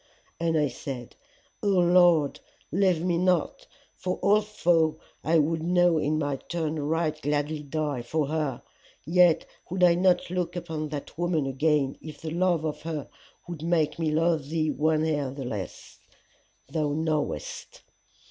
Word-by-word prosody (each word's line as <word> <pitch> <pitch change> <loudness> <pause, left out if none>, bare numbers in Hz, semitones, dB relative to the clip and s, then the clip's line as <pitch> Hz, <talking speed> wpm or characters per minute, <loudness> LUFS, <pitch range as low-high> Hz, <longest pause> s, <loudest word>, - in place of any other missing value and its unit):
And 165 -1 +1
I 150 -1 +3
said, 130 -3 -7 0.5
O - - -1
Lord, 175 -5 +4 0.3
leave 180 -1 +2
me 175 -2 +1
not, 185 - 0 0.3
for 180 0 -3
although 175 -7 +2 0.2
I 165 +1 +3
would 160 +1 +1
now 175 0 +3
in 155 +1 0
my 145 -3 -1
turn 160 0 -3
right 155 +2 -1
gladly 150 +1 -1
die 150 -2 -2
for 150 +6 -1
her, 150 -4 -2 0.4
yet 175 0 +4 0.2
would 185 +1 -1
I 175 -1 +7
not 180 0 +2
look 180 -1 -2
upon 160 -3 -4
that 145 -2 -6
woman 175 -4 +1
again 140 0 +1
if 155 -2 -9
the 160 - -5
love 175 -2 +1
of 150 - -3
her 155 -3 -5 0.4
would 170 -3 -6
make 160 -2 +1
me 160 -2 +1
love 160 -2 +1
thee 155 -1 0
one 155 +1 +1
hair 145 -4 0
the 135 0 -6
less 105 -6 -6 0.7
thou 150 0 -1
knowest. 155 - -3
160 Hz, 150 wpm, -27 LUFS, 150-175 Hz, 0.7 s, I